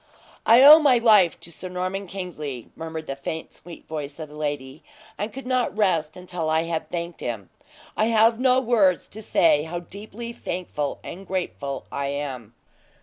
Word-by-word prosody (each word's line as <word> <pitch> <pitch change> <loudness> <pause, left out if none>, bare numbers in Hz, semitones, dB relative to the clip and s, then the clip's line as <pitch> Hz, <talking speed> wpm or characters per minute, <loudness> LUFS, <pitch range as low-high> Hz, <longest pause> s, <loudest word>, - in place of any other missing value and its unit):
"I 235 +3 +8
owe 300 +3 +11
my 280 -5 +5
life 210 -7 +5
to 170 - -10
Sir 185 +3 -6
Norman 185 +2 -3
Kingsley," 155 - -6
murmured 160 -1 -6
the 135 - -4
faint, 160 +4 -6
sweet 170 +1 -12
voice 150 -2 -6
of 155 -2 -7
the 150 - -13
lady, 145 -2 -4 0.3
"and 210 +2 -4
could 270 +4 -8
not 250 -5 0
rest 170 -7 +1
until 180 -3 -4
I 160 +1 +2
had 165 -1 -3
thanked 170 -1 -5
him. 110 -6 -5 0.4
I 215 - +2
have 225 0 +4
no 255 0 +4
words 225 -8 +2
to 220 - -8
say 160 -7 +3
how 170 +3 -5
deeply 215 +6 -9
thankful 170 -8 -4
and 195 +2 -9
grateful 145 -7 -4
I 140 0 -2
am." 135 -5 -5
175 Hz, 175 wpm, -24 LUFS, 150-210 Hz, 0.4 s, owe